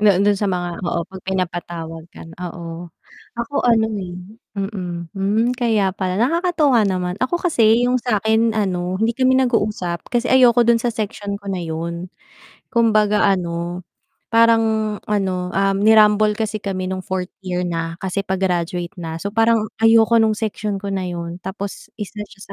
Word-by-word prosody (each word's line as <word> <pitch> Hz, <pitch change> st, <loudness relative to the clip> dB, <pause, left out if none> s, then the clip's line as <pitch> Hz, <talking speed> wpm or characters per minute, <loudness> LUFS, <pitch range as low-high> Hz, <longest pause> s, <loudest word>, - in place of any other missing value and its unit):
Noon 200 Hz, -3 st, +4 dB
dun 205 Hz, -1 st, +3 dB
sa 205 Hz, -, 0 dB
mga 175 Hz, -2 st, -2 dB
oo 170 Hz, -, -1 dB
'pag 190 Hz, -1 st, -10 dB
pinapatawag 170 Hz, -3 st, -4 dB
ka -, -, -10 dB, 0.2 s
oo. 170 Hz, 0 st, -7 dB, 0.5 s
Ako 235 Hz, +5 st, -5 dB
ano 225 Hz, -2 st, +4 dB
eh 180 Hz, -2 st, -6 dB, 0.4 s
mm, 180 Hz, -4 st, -4 dB
hmm, 210 Hz, +5 st, +1 dB
kaya 220 Hz, -5 st, +2 dB
pala 185 Hz, -1 st, -3 dB
nakakatuwa 290 Hz, -, +2 dB
naman 180 Hz, -1 st, -1 dB
ako 255 Hz, +8 st, 0 dB, 0.2 s
kasi 230 Hz, -3 st, +4 dB
yung 250 Hz, 0 st, +2 dB
sakin 220 Hz, -1 st, +1 dB
ano 185 Hz, -4 st, -1 dB
hindi 225 Hz, -, +3 dB
kami 260 Hz, +2 st, +2 dB
nag-uusap 210 Hz, -8 st, -1 dB
kasi 240 Hz, 0 st, -1 dB
ayoko 245 Hz, -2 st, +6 dB
dun 235 Hz, 0 st, +4 dB
sa 235 Hz, 0 st, -2 dB
section 205 Hz, -2 st, -4 dB
ko 200 Hz, 0 st, -6 dB
na 190 Hz, -, -2 dB
yun. 170 Hz, +2 st, -4 dB, 0.6 s
Kumbaga 215 Hz, -3 st, +3 dB
ano 175 Hz, -1 st, -2 dB, 0.5 s
parang 225 Hz, -2 st, +3 dB
ano, 185 Hz, -3 st, -1 dB
ah, 195 Hz, 0 st, +2 dB
ni-rumble 210 Hz, 0 st, +4 dB
kasi 215 Hz, -1 st, -2 dB
kami 185 Hz, -2 st, -3 dB
nung 185 Hz, 0 st, -3 dB
4th 185 Hz, 0 st, -4 dB
year 180 Hz, -1 st, -2 dB
na 165 Hz, -1 st, -3 dB
kasi 190 Hz, +1 st, -2 dB
pa-graduate 180 Hz, -2 st, -2 dB
na, 165 Hz, -2 st, -5 dB
so 200 Hz, +4 st, -5 dB
parang 225 Hz, -1 st, +3 dB, 0.2 s
ayoko 225 Hz, 0 st, +5 dB
ng 215 Hz, -1 st, +2 dB
section 210 Hz, -2 st, -2 dB
ko 200 Hz, +1 st, -6 dB
na 190 Hz, -, -1 dB
yun, 170 Hz, 0 st, -6 dB
tapos 195 Hz, +1 st, -6 dB
isa 210 Hz, 0 st, -6 dB
siya 195 Hz, -, -17 dB
200 Hz, 160 wpm, -20 LUFS, 180-225 Hz, 0.6 s, ayoko